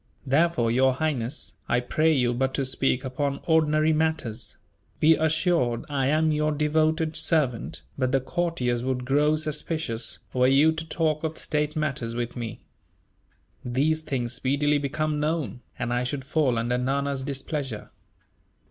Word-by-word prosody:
Therefore, 135 -4 +2
Your 130 +2 +4
Highness, 140 -3 -2 0.2
I 120 - +3
pray 155 +6 +2
you 125 -5 +2
but 130 +2 0
to 135 - 0
speak 130 0 0
upon 140 +2 -2
ordinary 155 -1 +3
matters; 155 -8 -1 0.4
be 160 +1 +6
assured 160 -6 +1
I 135 -2 0
am 155 +2 +3
your 150 0 +1
devoted 155 +1 +1
servant, 150 -7 0 0.2
but 130 -1 +1
the 135 - +3
courtiers 130 -5 -1
would 125 -1 -2
grow 145 +3 +3
suspicious, 155 -6 -2 0.2
were 125 0 +3
you 140 +4 +5
to 160 0 -5
talk 155 -1 0
of 160 0 -3
state 150 0 -1
matters 130 -7 -2
with 120 0 -3
me. 115 -3 -5 1.0
These 145 +6 +1
things 125 -5 -3
speedily 145 +3 +1
become 150 +2 -1
known, 150 - -2 0.2
and 120 - -2
I 120 0 +1
should 130 +1 -3
fall 140 -4 +1
under 120 +2 0
Nana's 140 +1 -1
displeasure." 135 -3 -4
140 Hz, 150 wpm, -26 LUFS, 125-155 Hz, 1.0 s, be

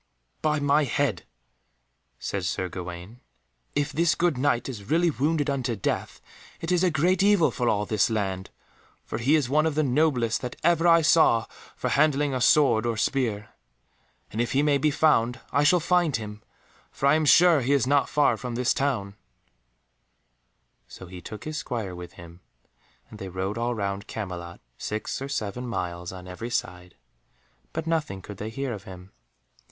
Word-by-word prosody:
"By 155 -1 +1
my 145 +1 +3
head," 135 -7 -1 0.9
said 100 -2 -4
Sir 90 0 -2
Gawaine, 90 +5 -8 0.6
"if 145 0 0
this 165 +3 +2
good 170 -3 +1
Knight 125 -2 0
is 110 -6 -8
really 170 +1 +3
wounded 150 +2 0
unto 130 -4 -1
death, 95 - -3 0.4
it 165 - -4
is 180 0 +2
a 185 - +4
great 175 +4 +2
evil 200 -4 +4
for 120 -3 0
all 105 0 +1
this 110 +3 +1
land, 95 -4 -2 0.6
for 110 - -4
he 135 +7 +3
is 150 -5 +1
one 155 +4 +2
of 155 - -2
the 155 - +2
noblest 130 -5 +1
that 125 -1 -5
ever 170 0 +3
I 165 -1 +6
saw 155 -7 +4 0.3
for - - -2
handling 145 -1 +2
a 130 - -2
sword 120 -5 +4
or 115 -1 -1
spear. 110 -4 -1 0.8
And 110 - -1
if 120 - -2
he 140 +2 +3
may 145 -1 +3
be 150 - +2
found, 125 -6 +2
I 145 - +2
shall 175 +4 +5
find 170 -2 +2
him, 105 -1 -6 0.5
for - - -4
I 140 - +6
am 155 0 +2
sure 165 0 +6
he 130 +3 +1
is 140 -4 +2
not 140 +1 +2
far 145 -1 +3
from 125 -2 -5
this 125 0 +1
town;" 110 -8 -1 1.7
so - - -11
he 90 0 -10
took 105 +2 -9
his 155 0 -5
Squire 115 -10 -4
with 90 -1 -9
him, 85 0 -13 0.7
and 105 - -11
they 95 - -6
rode 95 +4 -3
all 120 +1 -1
round 100 0 -3
Camelot, 90 -5 -6 0.2
six 110 +4 -4
or 135 - -5
seven 125 -1 -3
miles 90 -6 -4
on 90 -1 -10
every 90 +6 -6
side, 90 -6 -4 0.8
but 160 0 -4
nothing 155 - -2
could 105 - -9
they 105 +2 -5
hear 135 +2 -3
of 105 -1 -9
him. 95 0 -11
125 Hz, 180 wpm, -26 LUFS, 100-150 Hz, 1.7 s, I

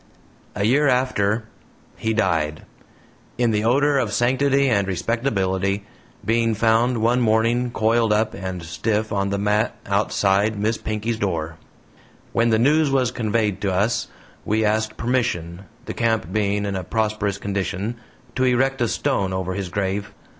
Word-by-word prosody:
A 100 - -1
year 140 +6 +3
after, 120 -5 +1 0.5
he 110 - -2
died, 80 -8 0 0.7
in 120 -2 +2
the 105 0 0
odor 140 +4 +3
of 115 -5 -1
sanctity 135 +5 +2
and 100 -6 +2
respectability, 100 -1 -1 0.4
being 115 0 +2
found 115 +2 +2
one 120 +2 +3
morning 115 +2 +2
coiled 115 0 +1
up 110 +1 +1
and 95 -2 -5
stiff 105 +6 -2
on 100 -1 0
the 100 - -1
mat 105 +3 +1
outside 100 +1 +1
Miss 110 +3 0
Pinkey's 110 +1 -3
door. 80 -4 -2 0.8
When 115 0 +2
the 110 - +3
news 145 +6 +3
was 130 -3 +1
conveyed 110 -4 -1
to 100 - 0
us, 100 +6 0 0.4
we 110 +1 +1
asked 110 +1 0
permission, 105 -8 -1 0.2
the - - -5
camp 110 -7 0
being 105 -1 0
in 100 -1 -2
a 95 - -3
prosperous 105 0 -1
condition, 100 +3 -3 0.4
to 130 - +1
erect 130 +1 +1
a 120 - +3
stone 95 -1 0
over 95 0 -2
his 95 -1 -4
grave. 100 +1 -3
110 Hz, 150 wpm, -22 LUFS, 100-120 Hz, 0.8 s, year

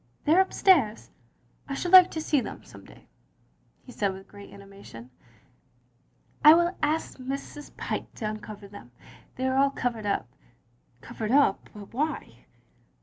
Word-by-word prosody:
"They 305 - +4
are 370 - +6
upstairs." 335 - +2 0.3
" - - -32
I 275 - -3
should 350 +5 -3
like 370 -1 +9
to 315 - -5
see 295 -3 +1
them - - -8
some - - -15
day, - - -18 0.4
" - - -40
he 250 - -12
said 200 -5 -1
with 190 0 -11
great 200 0 -14
animation. 195 -12 -13 0.6
" 125 - -37
I 305 +1 +9
will 345 +2 +1
ask 305 -1 -2
Mrs. 275 +3 -7
Pyke - - -5
to 220 - -6
uncover 215 -1 -8
them. 195 -12 -14 0.4
They 260 - -3
are 260 0 0
all 275 +1 +4
covered 240 -5 -3
up. 200 - -1 0.4
" 120 0 -38
"Covered 215 -1 -6
up, 275 -7 +2
but 205 0 -12
why?" 300 +5 -4
245 Hz, 170 wpm, -26 LUFS, 200-295 Hz, 0.6 s, like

